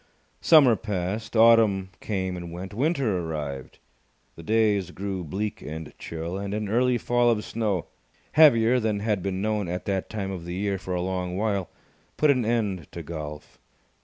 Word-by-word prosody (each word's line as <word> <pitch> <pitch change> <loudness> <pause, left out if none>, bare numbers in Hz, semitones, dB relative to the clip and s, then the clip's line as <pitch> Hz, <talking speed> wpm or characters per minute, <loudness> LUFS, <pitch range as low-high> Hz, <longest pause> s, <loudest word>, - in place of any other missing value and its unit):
Summer 140 -8 +6
passed. 105 +1 -4
Autumn 110 -4 +5
came 95 -3 -2
and 85 -1 -7
went. 95 +3 -7
Winter 130 - 0
arrived. 75 -5 -5 0.6
The - - -10
days 105 -1 +2
grew 95 0 -4
bleak 100 +6 -4
and 80 +1 -7
chill, 85 +3 -5
and 100 +1 -3
an 105 -1 -3
early 125 +3 +2
fall 120 +1 +2
of 110 -2 0
snow, 105 -7 -1 0.5
heavier 125 -5 +6
than 110 -3 -1
had 105 -3 0
been 95 +1 -2
known 105 -3 0
at 90 +1 -4
that 95 -2 -2
time 100 -3 -4
of 90 -3 -6
the 85 +1 -5
year 100 0 -1
for 90 -1 -4
a 90 - -1
long 90 -1 -2
while, 100 -4 -1 0.5
put 150 -1 +5
an 130 -3 +1
end 105 - -1
to 85 - -6
golf. 75 -1 -8
100 Hz, 170 wpm, -26 LUFS, 90-110 Hz, 0.6 s, Summer